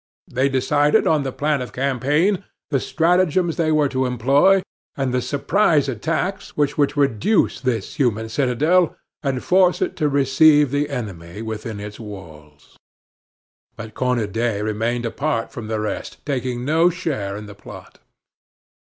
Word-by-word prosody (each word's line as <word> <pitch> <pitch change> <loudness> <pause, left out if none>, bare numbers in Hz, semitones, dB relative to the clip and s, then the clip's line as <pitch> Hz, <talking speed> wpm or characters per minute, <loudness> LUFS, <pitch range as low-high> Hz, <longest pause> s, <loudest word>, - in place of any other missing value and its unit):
They 130 +3 0
decided 145 +3 +2
on 155 -2 +3
the 135 -1 -3
plan 145 0 -1
of 125 - -7
campaign, 145 - +1 0.3
the 135 - +2
stratagems 175 +2 +1
they 160 -2 +1
were 155 -2 +3
to 130 -1 0
employ, 140 +11 +3 0.3
and 135 -2 -1
the 125 - +1
surprise 145 +3 +1
attacks 165 - -3
which 145 -1 +1
were 145 -1 +3
to 145 0 -2
reduce 135 - +1
this 120 -6 -2
human 110 -5 0
citadel 145 +9 +2 0.3
and 135 -3 -2
force 180 -1 +3
it - - -1
to 150 -3 +1
receive 145 +1 +4
the 145 +1 0
enemy 105 - -6
within 110 -1 -5
its 105 0 -8
walls. 80 -9 -12 1.0
But 110 -1 -9
Cornudet 115 -3 -1
remained 115 +3 -1
apart 115 0 -2
from 115 -3 -7
the 110 0 -2
rest, 105 0 -5
taking 125 -3 -2
no 165 +4 +4
share 140 - -3
in 105 - -8
the 105 - -10
plot. 100 - -13
130 Hz, 150 wpm, -21 LUFS, 115-150 Hz, 1.0 s, receive